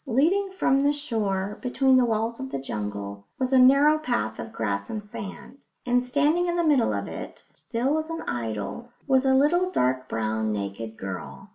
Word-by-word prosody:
Leading 335 - +2
from 270 -6 +3
the 285 +1 +3
shore, 210 -8 -2
between 265 +1 +3
the 255 - +4
walls 225 +1 -1
of 265 0 -5
the - - -3
jungle, 100 -5 -5
was 260 0 -1
a 260 - +6
narrow 280 +4 +6
path 110 - -2
of 110 - -6
grass 100 -3 -2
and 210 -1 -5
sand; 210 +6 -9 0.2
and 245 0 +2
standing 295 +7 +2
in 345 - 0
the 345 - +1
middle 285 -7 +3
of - - -2
it, - - -8
still 260 +6 -1
as 315 +1 -5
an 330 0 -4
idol, 115 - -4 0.2
was 265 -1 +3
a 265 0 +4
little 350 +7 +3
dark 130 - 0
brown 110 0 -1
naked 105 +2 -5
girl. 80 -9 -7
240 Hz, 185 wpm, -26 LUFS, -, 0.2 s, a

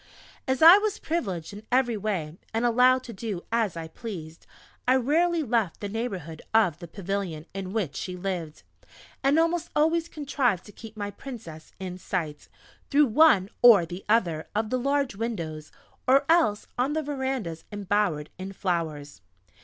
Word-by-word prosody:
As 260 +2 +1
I 345 +5 +11
was 430 0 -1
privileged 200 - -3
in 205 - -8
every 245 -2 +3
way 185 -7 -3 0.2
and 230 +2 +1
allowed 250 +2 +4
to 235 - -8
do 195 -3 -5
as 225 -7 0
I 165 -1 -5
pleased, 165 -4 -8 0.4
I 255 - +5
rarely 320 +6 +2
left 225 - 0
the 205 - -4
neighbourhood 190 -8 -4
of 185 -8 +3
the 170 - -8
pavilion 185 -3 -4
in 190 -1 -5
which 190 -10 -2
she 180 -1 -5
lived, 175 -4 -4 0.6
and 275 +3 +4
almost 335 +1 +1
always 325 +2 +2
contrived 270 - -1
to 210 - -12
keep 220 0 -12
my 205 -1 -3
Princess 200 - -10
in 185 -1 -6
sight, 160 -5 -4 0.4
through 295 +1 +5
one 270 -11 +5
or 225 -8 +8
the 175 +3 -8
other 175 -8 +2
of 215 0 -1
the 255 - +1
large 275 -2 0
windows, 170 -9 -4 0.4
or 270 +2 +5
else 320 -11 +3
on 265 +4 +1
the 315 0 -1
verandahs 265 - -3
embowered 205 -7 -1
in 190 +1 -6
flowers. 155 - -3
210 Hz, 160 wpm, -26 LUFS, 175-260 Hz, 0.6 s, I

